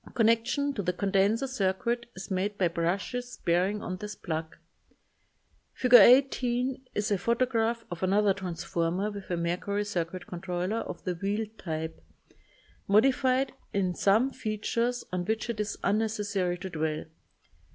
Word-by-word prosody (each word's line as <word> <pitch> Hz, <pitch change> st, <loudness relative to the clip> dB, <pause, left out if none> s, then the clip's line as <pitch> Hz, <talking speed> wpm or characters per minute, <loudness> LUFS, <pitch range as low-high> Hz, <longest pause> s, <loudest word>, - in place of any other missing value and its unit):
Connection 230 Hz, +5 st, +2 dB
to 210 Hz, -, -2 dB
the 180 Hz, -1 st, -1 dB
con 195 Hz, +2 st, -2 dB
denser 205 Hz, +6 st, +3 dB
circuit 235 Hz, +1 st, -1 dB
is 190 Hz, +1 st, -8 dB
made 200 Hz, +2 st, -1 dB
by 180 Hz, -, +3 dB
brushes 190 Hz, +9 st, -2 dB
bearing 185 Hz, +4 st, +1 dB
on 185 Hz, -, -4 dB
this 210 Hz, +1 st, -6 dB
plug. 160 Hz, -1 st, -4 dB, 1.2 s
Fig. 250 Hz, -1 st, 0 dB
18 255 Hz, 0 st, +5 dB
is 210 Hz, +1 st, -1 dB
a 200 Hz, -, +2 dB
photograph 230 Hz, +1 st, +1 dB
of 175 Hz, -, -5 dB
another 200 Hz, +2 st, +3 dB
trans 180 Hz, -4 st, -5 dB
former 180 Hz, +3 st, -1 dB
with 200 Hz, -2 st, -9 dB
a 175 Hz, -, -1 dB
mercury 180 Hz, +5 st, -1 dB
circuit 180 Hz, -2 st, -3 dB
controller 180 Hz, +3 st, -3 dB
of -, -, -5 dB
the 180 Hz, -, -1 dB
wheel 200 Hz, +5 st, -1 dB
type, 160 Hz, -, -5 dB, 0.8 s
modified 260 Hz, +5 st, +3 dB, 0.2 s
in 185 Hz, -2 st, +1 dB
some 220 Hz, +9 st, +3 dB
features 230 Hz, +2 st, -2 dB
on 180 Hz, -1 st, -1 dB
which 220 Hz, +3 st, -1 dB
it 220 Hz, -, -8 dB
is 210 Hz, -1 st, -2 dB
unnecessary 205 Hz, -4 st, 0 dB
to 190 Hz, +1 st, -7 dB
dwell. 155 Hz, -1 st, -2 dB
205 Hz, 145 wpm, -29 LUFS, 180-230 Hz, 1.2 s, 18